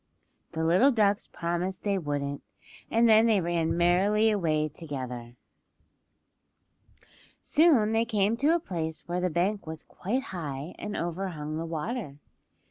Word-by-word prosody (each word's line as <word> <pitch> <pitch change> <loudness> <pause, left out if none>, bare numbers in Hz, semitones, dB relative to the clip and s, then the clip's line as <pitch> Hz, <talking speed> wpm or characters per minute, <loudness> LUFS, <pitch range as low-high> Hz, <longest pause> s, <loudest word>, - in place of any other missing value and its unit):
The 160 - -2
little 180 +12 +5
ducks 210 -5 +2
promised 175 +2 -3
they 200 -2 0
wouldn't, 145 -3 -3 0.5
and 230 +1 +4
then 220 +1 +6
they 215 -3 +4
ran 170 -1 0
merrily 200 +6 +3
away 155 -7 +1
together. 130 -6 -7 2.1
Soon 285 -10 +4
they 225 +1 +2
came 215 -1 +1
to 300 +6 +3
a - - +1
place 160 - -5
where 175 +1 -2
the 180 - +1
bank 185 +4 -1
was 160 0 -6
quite 245 +8 -3
high 150 -2 -5
and 210 0 -4
overhung 165 -3 -4
the 165 +1 -4
water. 165 - -4
180 Hz, 135 wpm, -28 LUFS, 160-215 Hz, 2.1 s, then